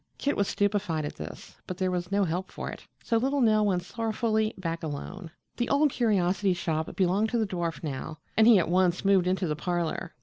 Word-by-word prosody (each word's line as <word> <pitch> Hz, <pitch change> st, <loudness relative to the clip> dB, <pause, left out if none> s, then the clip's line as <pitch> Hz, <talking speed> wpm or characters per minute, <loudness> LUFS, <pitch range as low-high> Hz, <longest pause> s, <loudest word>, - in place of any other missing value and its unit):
Kit 285 Hz, -, 0 dB
was 200 Hz, -, +1 dB
stupefied 200 Hz, -6 st, 0 dB
at -, -, -6 dB
this, 75 Hz, -, -9 dB
but 185 Hz, -, -5 dB
there 185 Hz, -1 st, 0 dB
was 180 Hz, 0 st, -3 dB
no 200 Hz, 0 st, +3 dB
help 180 Hz, +2 st, -2 dB
for -, -, -5 dB
it, -, -, -11 dB, 0.2 s
so 230 Hz, -, +1 dB
little 270 Hz, +5 st, +1 dB
Nell 215 Hz, -4 st, +4 dB
went 180 Hz, -3 st, +1 dB
sorrowfully 220 Hz, +1 st, 0 dB
back 165 Hz, -3 st, -3 dB
alone. 165 Hz, +4 st, -6 dB, 0.3 s
The 240 Hz, -, -1 dB
Old 285 Hz, +1 st, +3 dB
Curiosity 195 Hz, -5 st, +1 dB
Shop 160 Hz, -2 st, -2 dB
belonged 195 Hz, +4 st, +2 dB
to 240 Hz, -, 0 dB
the 225 Hz, -, +2 dB
dwarf 175 Hz, -4 st, -3 dB
now 150 Hz, +1 st, -5 dB, 0.2 s
and 220 Hz, +1 st, +5 dB
he 235 Hz, -3 st, +8 dB
at 175 Hz, -, +2 dB
once 180 Hz, +1 st, +2 dB
moved 195 Hz, -2 st, +4 dB
into 185 Hz, +1 st, +1 dB
the 150 Hz, -3 st, -1 dB
parlor. 175 Hz, +1 st, -2 dB
185 Hz, 210 wpm, -28 LUFS, 175-215 Hz, 0.3 s, he